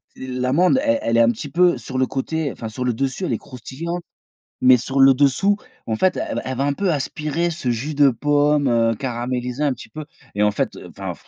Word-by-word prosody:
l'amande 130 - +1
elle 285 -1 +2
elle 115 0 +1
est - - +6
un 115 - +5
petit 135 +5 -7
peu 175 +2 +3
sur 130 - -6
le 130 - +2
côté, 145 +1 -2
enfin, 110 - -7
sur 125 +3 -4
le 125 - +1
dessus 135 - -2
elle 125 - -1
est - - 0
croustillante, 160 +7 -6 0.6
mais 130 0 +7
sur 135 +4 -3
le 135 0 +8
dessous 170 +10 +2 0.3
en 110 - 0
fait, 185 +9 +2
elle - - -3
va - - -1
elle 130 -1 -4
va, 135 - 0
un 145 - +1
peu 190 +2 0
aspirer 155 +3 -2
ce 155 -7 -3
jus 140 +6 -3
de 145 -1 +6
pomme, 145 +2 +2
heu, 115 -1 +2
caramélisé 125 +2 -3
un 140 -3 +2
petit - - -12
peu 155 -1 -8 0.3
et 105 - +2
en 105 - +3
fait - - -2
enfin - - -6
135 Hz, 230 wpm, -21 LUFS, 125-155 Hz, 0.6 s, le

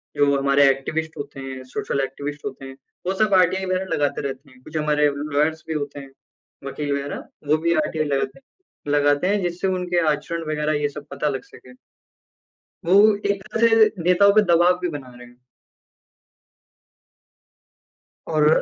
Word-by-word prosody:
जो 140 -1 +3
हमारे 140 0 +4
एक्टिविस्ट 155 +4 -2
होते 140 -1 -7
हैं, 130 -1 -7
सोशल 130 +1 -3
एक्टिविस्ट 145 +2 -5
होते 135 - -6
हैं, 135 0 -9 0.3
वो 190 - +1
सब 210 0 +1
आरटीआई 185 +1 +3
वगैरह 185 +1 -1
लगाते 145 0 0
रहते 140 0 -6
हैं। 130 0 -20
कुछ 155 0 -6
हमारे 150 -1 +2
लॉयर्स 150 +2 -1
भी 160 - -2
होते 145 -1 -4
हैं, 135 -1 -11 0.5
वकील 145 +1 -3
वगैरह 140 0 -4 0.2
वो 155 +1 +4
भी 170 - +4
आरटीआई 155 -1 -2
लगाते 135 - -2 0.5
लगाते 145 +3 +2
हैं 205 0 +1
जिससे 175 +2 -2
उनके 180 -1 0
आचरण 165 +3 -2
वगैरह 150 0 0
ये 145 - +1
सब 145 0 -10
पता 150 - -1
लग 135 -2 -4
सकें। 125 0 -16 1.1
वो 180 - +2 0.4
एक 200 -1 -4
तरह 225 -4 +4
नेताओं 180 +3 +5
पे 215 - +7
दबाव 175 +2 +4
भी 180 -1 -2
बना 130 -2 -12
रहे 125 0 -12
हैं। 120 0 -20 2.9
और 155 -2 +2
150 Hz, 160 wpm, -22 LUFS, 140-175 Hz, 2.9 s, पे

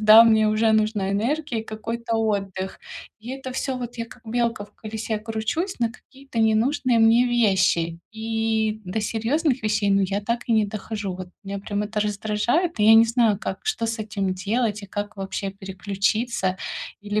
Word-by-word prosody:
да, 215 +1 +9
мне 220 -1 +5
уже 220 +1 +3
нужна 215 -3 +1
энергия 240 +4 -1
и 220 - -9
какой-то 230 +1 -3
отдых. 195 -3 -2 0.4
И 225 +3 -8
это 265 0 -6
всё, 260 0 -2
вот, 245 0 -6
я 230 - -1
как 230 0 -15
белка 230 -2 0
в - - -23
колесе 220 0 -4
кручусь 225 - -3
на 230 -1 +2
какие-то 270 0 -10
ненужные 230 +3 +3
мне 225 +2 +5
вещи. 190 -8 +2 0.2
И 220 -1 0
до 185 +5 -2
серьёзных 250 +6 0
вещей, 210 -1 +1
ну, 195 0 +4
я 195 +2 0
так 235 +3 -2
и - - +3
не 215 -2 +3
дохожу. 210 -1 -4
Вот 185 -1 -7 0.2
меня, 200 0 -4
прям, 205 +1 -3
это 210 +1 -3
раздражает. 215 - 0
И 210 - +4
я 220 - +8
не 225 +1 +8
знаю, 230 -3 +2
как, 190 - -4
что 435 - -1
с 225 0 -2
этим 200 -3 -2
делать 215 -1 0
и - - -8
как 205 +2 -5
вообще 195 0 -3
переключиться, 195 +1 -1 0.4
или 205 +1 -1
220 Hz, 180 wpm, -24 LUFS, 205-230 Hz, 0.4 s, да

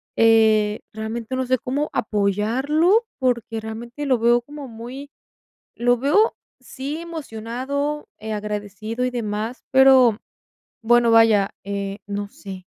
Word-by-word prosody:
eh, 220 -2 +4
realmente, 225 +3 -4
no 260 0 -1
sé, 255 +1 +2
cómo 280 +6 -2
apoyarlo, 250 - +1
porque 235 -3 -1
realmente 235 +6 -7
lo 260 -3 +2
veo 235 +1 +3
como 285 +2 -9
muy 245 +5 -9 0.7
lo 245 +1 +3
veo 345 - +3 0.3
sí 270 +4 -6
emocionado, 280 -1 -4
eh, 220 +1 -6
agradecido 210 +2 -4
y 255 - 0
demás, 225 0 -4
pero, 260 -4 +6 0.6
bueno, 235 0 +4
vaya, 220 -3 +5
eh, 200 0 -4
no 205 0 -4
sé 190 -3 -10
235 Hz, 120 wpm, -22 LUFS, 215-265 Hz, 0.7 s, pero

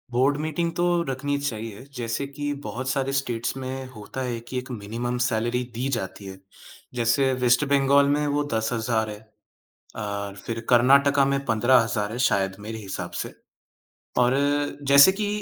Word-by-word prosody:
Board 130 +4 +2
meeting 160 +2 -1
तो 175 - +1 0.2
रखनी 145 +2 -1
चाहिए, 115 -5 -5
जैसे 120 +2 -2
कि 145 +1 -4
बहुत 130 +1 -4
सारे 135 +1 0
स्टेट्स 120 -4 -1
में 130 0 -5
होता 115 +2 -8
है 120 -2 -3
कि 130 - -4
एक 125 +1 -5
मिनिमम 120 +2 -4
सैलरी 120 +1 0
दी 125 +3 -1
जाती 95 -1 -6
है। 95 0 -9 0.6
जैसे 120 +3 +2
वेस्ट 125 +2 +4
बंगाल 140 0 +4
में 150 0 0
वो 145 0 +1
10,000 110 0 0
है 105 0 -7 0.8
अ, 100 -2 -4
फिर 115 -1 -3
कर्नाटक 140 +3 +5
में 140 0 +1
15,000 115 -2 +2
है 115 - -5
शायद, 95 -6 +1
मेरे 110 +2 -6
हिसाब 100 -3 -6
से। - - -6 0.9
और 125 +1 +4 0.6
जैसे 140 +6 +9
कि 205 +2 -2
125 Hz, 155 wpm, -25 LUFS, 115-140 Hz, 0.9 s, जैसे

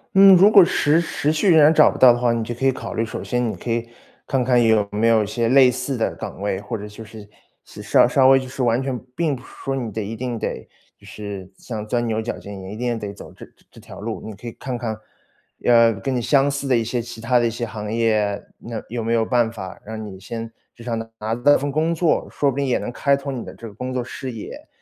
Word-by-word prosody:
嗯。 195 -1 +9
如 195 +4 +6
果 200 - +9
持 160 -1 +2
持 155 -2 -1
续 160 +5 +1
仍 160 - +6
然 150 +2 +6
找 - - +6
不 - - -8
到 125 -2 +8
的 120 - -3
话， 120 -1 +2
你 115 - -1
就 120 - -4
可 130 - -3
以 135 - +5
考 - - -7
虑， 115 - 0
首 110 - -6
先 125 -2 -1
你 - - -7
可 120 - -5
以 115 0 -2 0.4
看 130 -1 +1
看 125 -1 +3
有 110 -3 +3
没 105 +3 +1
有 110 -2 +4
一 - - -5
些 115 +2 -1
类 130 -1 +6
似 130 +1 -3
的 115 - -1
岗 - - -7
位， 100 -1 -1
或 115 +2 -5
者 105 0 -8
就 105 +2 -11
是 110 -1 -12 0.4
是 - - -12
稍 - - +4
稍 130 -1 +4
微 135 0 +6
就 130 - -7
是 130 0 -4
完 120 +1 +2
全 130 -2 -3 0.2
并 160 -5 0
不 120 - -11
是 - - -16 0.2
说 135 0 -2
你 120 -5 -4
得 110 +1 -4
一 110 +3 -5
定 120 0 -4
得 - - -5 0.3
就 - - -20
是 100 -3 -8
像 110 -3 -6
钻 120 +1 0
牛 110 -1 -1
角 115 - -4
尖， 100 -1 -9
也 95 +1 -8
一 105 - -7
定 120 -1 -2
得 105 -1 -5
走 - - -12
这 - - -12 0.3
这 - - -15
条 - - -12
路。 110 +1 -5
你 110 - -7
可 120 +4 -11
以 - - -4
看 130 -2 -5
看， 115 -3 -3 0.7
呃， 115 -1 +6
跟 110 +6 -3
你 120 - 0
相 140 +2 +3
似 140 0 -3
的 130 -2 +3
一 115 - 0
些 120 +2 -2
其 115 -1 -9
他 120 +2 +2
的 120 - +2
一 - - 0
些 120 +1 -4
行 105 -2 -6
业， 110 -3 0 0.2
那 115 -1 -7
有 115 0 -3
没 115 +1 0
有 115 -1 +2
办 120 -2 +1
法， 95 -5 -9
让 110 0 -7
你 95 -2 -9
先 115 +3 -7 0.2
就 120 - -13
像 115 -2 -2
拿 115 0 -7
拿 110 +2 -2
到 145 +4 +4
份 140 0 -3
工 160 +3 +1
作， 165 -1 +1
说 140 -1 0
不 135 - -8
定 140 - 0
也 125 - +2
能 - - -5
开 140 +2 +1
拓 140 0 -5
你 125 -3 -5
的 - - -9
这 115 - -9
个 105 - -11
工 125 +4 -5
作 125 -1 -2
视 130 +1 -6
野。 110 -3 -9
120 Hz, 300 characters per minute, -21 LUFS, 110-130 Hz, 0.7 s, 嗯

